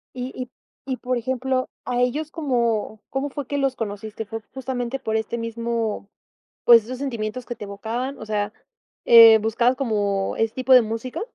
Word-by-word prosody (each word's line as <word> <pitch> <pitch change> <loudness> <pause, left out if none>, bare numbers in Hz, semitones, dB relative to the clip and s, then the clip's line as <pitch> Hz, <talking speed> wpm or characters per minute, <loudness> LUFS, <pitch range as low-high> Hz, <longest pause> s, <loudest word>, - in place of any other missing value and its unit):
Y 250 +1 -4
y 250 -1 -5 0.4
y, 260 - 0
por 250 0 -2
ejemplo, 255 +1 -1 0.2
¿a 245 0 -1
ellos 290 +5 0
cómo 235 -8 -1
cómo 270 +2 -2
fue 280 0 -5
que 285 - -2
los 270 -2 0
conociste?, 215 0 -5
¿fue 225 +1 -6
justamente 260 -1 -3
por 220 -3 -1
este 220 +2 -3
mismo 230 -2 -3 0.6
pues, 230 -3 +8
esos 250 +2 -6
sentimientos 240 -3 -4
que 240 - -4
te 210 - -8
evocaban? 230 +7 -4
O - - -8
sea, 210 0 -1 0.5
eh, 230 -1 +9
¿buscabas 235 +4 +1
como 205 -6 0
ese 225 0 0
tipo 260 0 +1
de 250 - +8
música? 225 +3 -4
235 Hz, 175 wpm, -23 LUFS, 220-255 Hz, 0.6 s, eh